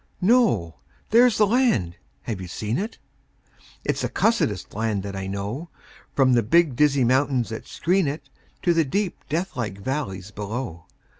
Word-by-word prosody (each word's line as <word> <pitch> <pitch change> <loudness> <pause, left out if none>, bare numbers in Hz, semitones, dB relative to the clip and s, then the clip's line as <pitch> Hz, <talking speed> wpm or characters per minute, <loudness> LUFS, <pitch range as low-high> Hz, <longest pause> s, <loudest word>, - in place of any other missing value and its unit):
No! 185 - +3 0.3
There's 235 -1 +6
the 215 - +5
land. 205 - +2 0.3
(Have 105 -5 -4
you 90 - -6
seen 110 - -2
it?) 220 +3 -4 0.9
It's - - 0
the - - -1
cussedest 110 - 0
land 110 -2 -1
that 100 -1 -5
I 95 0 -4
know, 100 - -4 0.5
From 130 -2 +4
the 120 - +4
big, 155 +4 +3
dizzy 140 -1 +3
mountains 130 0 +2
that 110 - -7
screen 180 0 +1
it 140 0 -4 0.4
To 175 - +4
the 165 -1 +3
deep, 190 +7 -2
deathlike 130 - -2
valleys 100 -5 -4
below. 105 -5 -5
130 Hz, 155 wpm, -24 LUFS, -, 0.9 s, There's